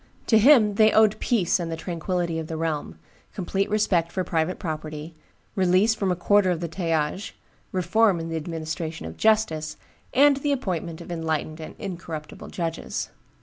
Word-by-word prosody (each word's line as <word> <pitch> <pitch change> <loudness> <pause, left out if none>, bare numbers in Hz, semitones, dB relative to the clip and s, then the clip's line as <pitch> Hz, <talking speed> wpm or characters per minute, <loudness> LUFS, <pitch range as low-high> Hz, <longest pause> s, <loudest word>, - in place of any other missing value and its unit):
To 220 - +5
him 225 -4 +6
they 215 0 +6
owed 215 -1 +4
peace 200 -7 +1
and 170 -1 -3
the 165 - -3
tranquillity 170 0 -2
of 160 - -5
the 160 - -4
realm, 160 -2 -3 0.4
complete 195 +1 -1
respect 185 -5 +1
for 185 - -1
private 165 +1 -1
property, 155 -1 -5 0.4
release 190 +3 +3
from 200 -4 -1
a - - +1
quarter 200 +2 +3
of 175 -2 0
the 170 - -3
talliages, 165 +2 -2 0.4
reform 185 +1 +2
in 165 - -4
the 165 - -3
administration 160 - -4
of 80 0 -7
justice, 165 -9 +1 0.3
and 280 +1 +5
the 285 +1 0
appointment 175 - -3
of - - -9
enlightened 160 -1 -2
and 155 - -8
incorruptible 170 -5 -7
judges. 165 -2 -4
175 Hz, 165 wpm, -25 LUFS, 160-205 Hz, 0.4 s, him